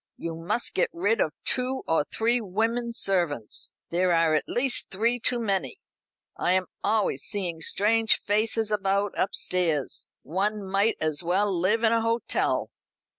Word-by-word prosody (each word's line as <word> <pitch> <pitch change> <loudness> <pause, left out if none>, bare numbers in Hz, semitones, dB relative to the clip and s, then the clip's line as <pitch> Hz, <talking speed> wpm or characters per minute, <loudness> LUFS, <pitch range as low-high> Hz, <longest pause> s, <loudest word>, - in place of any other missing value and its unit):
You 170 - -5
must 185 +9 -2
get - - +1
rid 200 +6 +1
of 155 - +1
two 255 +1 +1
or 160 -2 +1
three 235 +2 +1
women 225 +4 -1
servants. 175 - -1 0.2
There 180 +1 +1
are 165 -2 +3
at 155 -2 +1
least 250 +1 +1
three 230 +5 +1
too 240 +1 +1
many. 200 -4 -1 0.6
I 180 - +1
am 185 0 +2 0.2
always 210 -11 +1
seeing 175 -4 -3
strange 220 +5 +2
faces 215 +1 0
about 200 -1 0
upstairs. 170 -6 0
One 200 +5 -2
might 200 +3 +1
as 155 0 +1
well 190 +4 +1
live 200 +7 +1
in 225 - +4
a 230 0 +2
hotel. 230 +1 0
200 Hz, 150 wpm, -26 LUFS, 175-225 Hz, 0.6 s, in